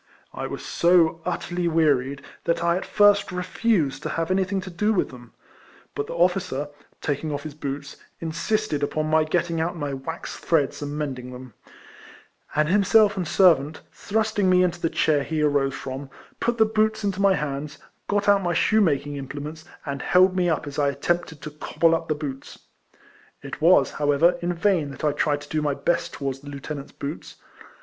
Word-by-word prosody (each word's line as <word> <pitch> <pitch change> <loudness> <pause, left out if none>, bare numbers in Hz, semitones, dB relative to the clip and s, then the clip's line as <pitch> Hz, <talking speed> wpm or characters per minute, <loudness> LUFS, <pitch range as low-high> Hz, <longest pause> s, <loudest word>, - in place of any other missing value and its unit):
I - - -4
was - - -7
so 170 -2 +3
utterly 175 0 -2
wearied, 140 -4 +1 0.2
that 170 0 0
I 170 0 +3
at 185 - -4
first 205 -1 +4
refused 180 -6 0
to - - -4
have 165 +2 -2
anything 190 +1 +1
to 185 0 -8
do 210 +5 +1
with 195 - 0
tliem; 120 -2 -13 0.6
but 145 - -3
the - - -6
officer, 175 -5 0 0.3
taking 150 +2 -2
off 145 0 -4
his 155 -2 -7
boots, 140 -1 -6 0.2
insisted 170 +1 -1
upon 155 +2 -1
my 160 0 +4
getting 170 0 0
out 170 +2 -2
my 145 -3 -3
wax 150 +5 -6
threads 150 -5 0
and 145 0 -4
mending 130 -4 -4
them; 125 -2 -10 1.0
and 150 0 +3
himself 205 +3 +4
and 180 -4 -2
servant, 160 -6 +3
thrusting 215 -2 0
me 180 0 +5
into 175 -1 -1
the 165 - +1
chair 150 -3 +2
he 155 0 -1
arose 140 -2 +1
from, 135 +1 -6 0.3
put 235 0 0
the 220 - +5
boots 220 0 0
into 200 -1 -1
my 195 -1 +5
hands, 145 -1 -4 0.3
got 205 0 0
out 200 -1 +5
my 175 -2 -1
shoemaking 150 -9 +2
im 135 -1 -6
plements, 150 +3 -7 0.2
and 140 -2 -4
held 185 +1 +4
me 180 -1 +2
up 155 -2 -1
as 145 0 -5
I 145 -1 +3
attempted 160 +2 -2
to 150 - -6
cobble 165 +2 +1
up 165 0 -1
the 155 - 0
boots. 140 -3 -7 0.9
It - - -7
was, - - +5
however, 150 +4 +3
in 175 +1 -1
vain 170 -5 +1
that 140 - -10
I 150 - +3
tried 145 0 0
to 145 - -12
do 155 - -1
my 145 -2 0
best 155 +5 -1
towards 135 -1 -4
the 145 +1 -11
lieutenant's 140 0 -7
boots. 140 +3 -7
160 Hz, 190 wpm, -24 LUFS, 145-180 Hz, 1.0 s, me